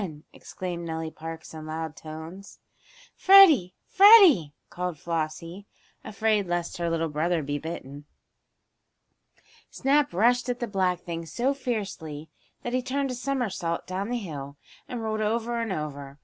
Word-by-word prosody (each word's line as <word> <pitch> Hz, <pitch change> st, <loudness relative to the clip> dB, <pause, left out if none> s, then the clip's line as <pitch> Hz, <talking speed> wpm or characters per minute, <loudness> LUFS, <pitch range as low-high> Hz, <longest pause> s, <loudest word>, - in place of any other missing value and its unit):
exclaimed 175 Hz, -2 st, -6 dB
Nellie 160 Hz, -1 st, -4 dB
Parks, 160 Hz, 0 st, -9 dB
in 155 Hz, -1 st, -8 dB
loud 160 Hz, 0 st, -5 dB
tones. 160 Hz, +5 st, -10 dB, 0.6 s
"Freddie! 340 Hz, -, +7 dB
Freddie!" 375 Hz, -, +7 dB, 0.2 s
called 180 Hz, -2 st, -4 dB
Flossie, 165 Hz, +4 st, -4 dB, 0.4 s
afraid 215 Hz, -1 st, 0 dB
lest 175 Hz, 0 st, -2 dB
her 170 Hz, -1 st, -1 dB
little 165 Hz, 0 st, 0 dB
brother 160 Hz, +2 st, -1 dB
be 145 Hz, +1 st, -3 dB
bitten. 145 Hz, -2 st, -8 dB, 1.6 s
Snap 280 Hz, +1 st, +1 dB
rushed 245 Hz, +7 st, +2 dB
at 245 Hz, 0 st, -2 dB
the 240 Hz, -, -1 dB
black 185 Hz, -4 st, 0 dB
thing 165 Hz, -1 st, -6 dB
so 250 Hz, -, 0 dB
fiercely 195 Hz, -, -5 dB, 0.3 s
that 240 Hz, -, -4 dB
he 255 Hz, -, +1 dB
turned 275 Hz, +1 st, -2 dB
a -, -, -3 dB
somersault 245 Hz, -10 st, -2 dB
down 190 Hz, +3 st, -4 dB
the 245 Hz, -, -1 dB
hill, 145 Hz, -9 st, -7 dB, 0.3 s
and 240 Hz, -2 st, -5 dB
rolled 215 Hz, 0 st, -2 dB
over 230 Hz, +2 st, -1 dB
and 225 Hz, -3 st, -3 dB
over. 145 Hz, -4 st, -5 dB
180 Hz, 140 wpm, -26 LUFS, 160-240 Hz, 1.6 s, Freddie